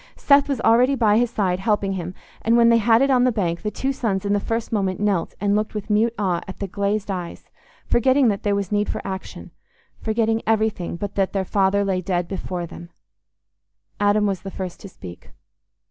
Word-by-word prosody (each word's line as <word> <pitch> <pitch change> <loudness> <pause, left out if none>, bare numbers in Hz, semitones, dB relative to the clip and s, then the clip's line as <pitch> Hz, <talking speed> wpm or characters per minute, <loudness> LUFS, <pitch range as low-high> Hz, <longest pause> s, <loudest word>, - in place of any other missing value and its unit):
Seth 280 0 +4
was 275 -4 -1
already 250 +5 +4
by 220 -3 +3
his 240 -1 +1
side, 190 -5 -1
helping 200 -1 0
him, 180 -1 -5 0.3
and 230 +1 +3
when 235 0 +6
they 230 0 +5
had 230 +3 +4
it 275 - +2
on 250 -1 +4
the 255 - +3
bank, 175 -6 -2
the 210 - -2
two 270 +5 -2
sons 205 -7 -2
in 200 - +1
the 205 - +2
first 225 +2 -3
moment 195 -4 -1
knelt 200 -4 0
and 205 +1 +1
looked 215 +1 -2
with 210 +1 -4
mute 225 +3 +2
awe 185 -4 0
at 190 - -8
the 200 - -3
glazed 200 +2 -2
eyes, 180 -3 -6 0.3
forgetting 260 +2 +3
that 200 -2 -2
there 205 -1 0
was 200 -1 -3
need 205 0 0
for - - -2
action—forgetting 220 +3 -4
everything 220 -6 0
but 200 +3 -5
that 195 -1 0
their 195 -1 -1
father 200 +1 +1
lay 190 -2 0
dead 175 -1 -1
before 180 -2 -4
them. 170 +1 -11 1.1
Adam 205 +1 +3
was 195 -3 -1
the 195 - -7
first 185 -2 -6
to 200 - -10
speak. 90 - -12
205 Hz, 210 wpm, -22 LUFS, 190-225 Hz, 1.1 s, when